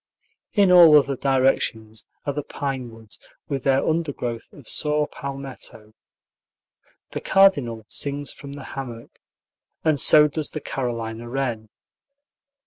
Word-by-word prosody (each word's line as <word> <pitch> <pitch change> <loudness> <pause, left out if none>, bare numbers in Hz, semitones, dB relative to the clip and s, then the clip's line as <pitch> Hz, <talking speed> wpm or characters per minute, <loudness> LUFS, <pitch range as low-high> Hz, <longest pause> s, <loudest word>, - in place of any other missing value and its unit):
In 200 -3 +4
all 170 -4 +9
other 140 -1 +2
directions 130 -5 0 0.2
are 145 - -1
the 150 - -3
pine 135 -3 -5
woods, 115 -2 -13 0.3
with 135 -3 -3
their 135 0 +2
undergrowth 145 -8 -3
of 140 -6 -16
saw 150 0 0
palmetto. 135 -7 -9 1.2
The - - -5
cardinal 140 - +3
sings 145 +3 -3
from 140 -1 -10
the 140 -1 -8
hammock, 120 -4 -8 0.7
and 155 -3 +2
so 150 +2 +7
does 150 0 -3
the 155 - -5
Carolina 115 -4 -4
wren. 120 -4 -3
135 Hz, 125 wpm, -23 LUFS, 120-150 Hz, 1.2 s, all